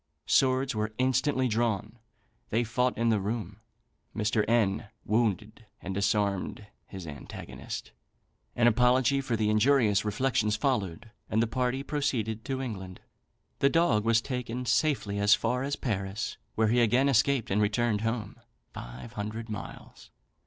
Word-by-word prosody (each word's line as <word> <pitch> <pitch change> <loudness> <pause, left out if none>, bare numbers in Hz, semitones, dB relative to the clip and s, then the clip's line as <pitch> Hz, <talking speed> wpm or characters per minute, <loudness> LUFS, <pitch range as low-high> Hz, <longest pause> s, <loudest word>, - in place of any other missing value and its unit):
Swords 130 0 +3
were 110 0 -3
instantly 130 +1 +2
drawn; 115 -1 -1 0.5
they 115 +2 +1
fought 125 +2 0
in 115 0 +2
the 110 -2 +3
room. 105 0 -4 0.5
Mr. 105 0 +1
N 110 -2 +2 0.2
wounded 110 0 -1
and 95 - -5
disarmed 100 0 0 0.2
his 95 -3 -8
antagonist; 75 -2 -8 0.6
an 120 - +3
apology 125 +3 +4
for 125 -4 -1
the 105 -1 +1
injurious 110 -2 +3
reflections 105 0 +1
followed, 110 - -2 0.2
and 110 - +1
the 115 - +3
party 125 +3 -1
proceeded 125 -7 -2
to 135 0 -2
England. 95 -7 -6 0.6
The 140 - +4
dog 165 -11 +3
was 115 0 +3
taken 125 -1 -4
safely 120 -8 +1
as 100 +2 +6
far 125 +3 -1
as 140 +1 -1
Paris, 95 -4 -3 0.2
where 110 -1 +2
he 120 +2 +3
again 120 +4 +3
escaped, 135 -2 +2
and 105 +2 +2
returned 105 +1 +1
home 115 -1 -3 0.4
(five - - -9
hundred 110 +2 -5
miles). 105 -3 -8
115 Hz, 140 wpm, -29 LUFS, 105-125 Hz, 0.6 s, as